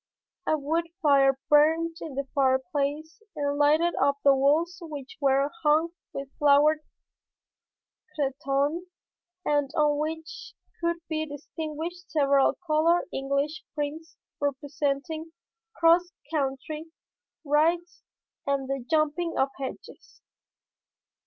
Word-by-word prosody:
A 310 - +3
wood 320 +4 -1 0.2
fire 275 -2 +5
burned 320 +2 +4
in 300 -4 -6
the 275 0 -2
fireplace 280 - 0
and 285 -1 -1
lighted 305 +4 +3
up 280 0 +3
the 280 - +7
walls 315 +7 +2
which 295 -5 -8
were 275 +1 +3
hung 310 +2 +3 0.2
with 275 0 -5
flowered 295 +1 +5 1.4
cretonne 280 +4 -1 0.6
and 290 -2 +1
on 295 -1 +3
which 320 +1 -5 0.3
could 340 0 +1
be 315 0 -2
distinguished 315 +4 -6
several 280 -3 +3
colored 330 +3 +2
English 280 +5 -1
prints 310 +3 -4 0.2
representing 285 +3 -2 0.4
cross 345 +2 +4 0.2
country 300 +2 -2 0.6
rides 335 +4 +1 0.5
and 275 -1 0
the 275 -2 -3
jumping 320 +2 +1
of 265 - +2
hedges. 265 - -9
295 Hz, 105 wpm, -27 LUFS, 280-320 Hz, 1.4 s, the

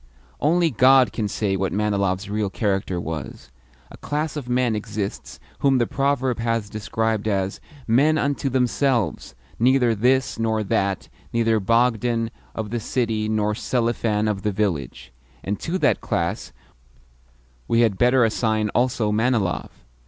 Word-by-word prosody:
Only 165 +2 +2
God 130 -2 +5
can 110 -2 -1
say 100 -1 -1
what 95 -1 -1
Manilov's 100 -1 0
real 105 0 -1
character 95 -3 -1
was. 80 -6 -6 0.4
A - - -11
class 150 +1 -3
of 135 -5 -6
men 125 -2 +1
exists 105 -1 -5 0.2
whom 135 -2 +3
the 120 - +2
proverb 135 -2 0
has 115 -3 -1
described 110 0 -2
as 95 -2 -1 0.2
"men 140 +7 +3
unto 140 -1 0
themselves, 125 - 0 0.2
neither 125 0 +4
this 125 +3 +1
nor 110 -1 0
that 95 -1 -1 0.2
neither 115 -1 +2
Bogdan 115 +1 +1 0.2
of 110 -2 -4
the 120 - -1
city 110 -2 -1
nor 105 -1 +1
Selifan 115 -2 0
of 105 -2 -1
the 105 - 0
village." 85 - -3 0.3
And 100 +1 -3
to 170 +3 -2
that - - +2
class - - -2 1.2
we 115 - +3
had 110 -5 +2
better 125 0 +4
assign 110 -1 0
also 120 -2 +1
Manilov. 110 -4 0
110 Hz, 140 wpm, -23 LUFS, 105-125 Hz, 1.2 s, God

